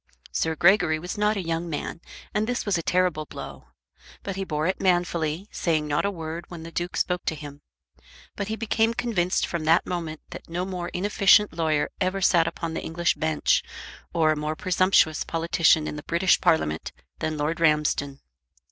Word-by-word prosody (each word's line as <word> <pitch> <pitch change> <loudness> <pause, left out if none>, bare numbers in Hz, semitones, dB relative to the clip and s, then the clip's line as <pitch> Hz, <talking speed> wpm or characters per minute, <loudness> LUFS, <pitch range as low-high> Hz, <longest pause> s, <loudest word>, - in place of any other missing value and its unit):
Sir 160 0 0
Gregory 175 -2 +4
was 175 +3 -6
not 210 +1 +1
a 190 - -2
young 165 +1 -2
man, 165 +2 -4 0.3
and 210 +1 0
this 245 0 -2
was 205 -3 +1
a 170 - 0
terrible 180 -3 +1
blow. - - -9 0.6
But 195 - -4
he 195 - -2
bore 155 -4 -2
it 185 - -1
manfully, 175 -1 0
saying 160 -3 0
not 150 +4 0
a - - +2
word 165 -2 -6
when 170 -2 -8
the 165 - -9
Duke 175 +1 -3
spoke 180 0 0
to 160 - -1
him; 145 -1 -10 0.7
but 200 - -3
he 220 - -2
became 225 +1 +1
convinced 185 -8 0
from 170 -2 -4
that 165 +3 +4
moment 165 -3 -4
that - - -9
no 175 +2 -2
more 180 -2 -4
inefficient 205 +1 +4
lawyer 160 -3 +1
ever 185 +1 0
sat 175 -3 +4
upon 165 -1 -4
the - - -3
English 170 +1 0
bench, 155 -1 +1 0.5
or 160 -2 +3
a - - +1
more 150 +1 -3
presumptuous 185 -3 +2
politician 165 -1 +2
in - - -5
the - - -6
British 170 +1 +3
Parliament, 80 - +1 0.3
than 155 -1 -2
Lord 150 +3 -1
Ramsden. 150 -3 +1
170 Hz, 185 wpm, -25 LUFS, 155-185 Hz, 0.7 s, Gregory